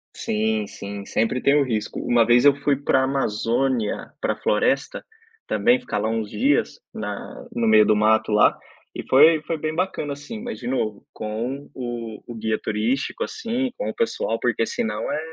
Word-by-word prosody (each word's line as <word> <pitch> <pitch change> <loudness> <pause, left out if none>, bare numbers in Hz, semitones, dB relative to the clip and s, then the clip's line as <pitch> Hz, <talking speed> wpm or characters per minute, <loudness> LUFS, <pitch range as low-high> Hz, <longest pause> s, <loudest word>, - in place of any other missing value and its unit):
Sim, 110 0 -1
sim, 100 0 -7
sempre 115 +3 0
tem 140 +1 +4
o 145 - +4
risco. 110 -5 -3
Uma 120 -1 +3
vez 120 +2 +5
eu 140 -1 +7
fui 140 -1 +3
para 135 -1 +2
a - - +1
Amazônia 125 -2 -1
para - - 0
a - - -12
floresta 135 +6 0 0.4
também 245 +1 +3
ficar 250 - -4
lá 110 - 0
uns 110 -2 -2
dias 285 - +1
na - - -6
no 235 -2 0
meio 215 -1 +6
do - - +4
mato 110 +1 +3
lá 105 0 +4 0.4
e - - -5
foi 155 +4 +6
foi 165 - -2
bem 155 +1 -3
bacana 170 -4 -2
assim, 215 +11 -8
mas 240 0 -6
de 120 - -6
novo 110 -5 -2
com 120 +6 -4
o 120 -3 -6
o 120 - -7
guia 110 0 -1
turístico, 115 +6 -1
assim 245 +3 -2
com - - -3
o - - -4
pessoal, 465 +1 -1
porque - - +1
se 240 - -2
não 225 - -3
é, - - -1
130 Hz, 190 wpm, -23 LUFS, 110-160 Hz, 0.4 s, eu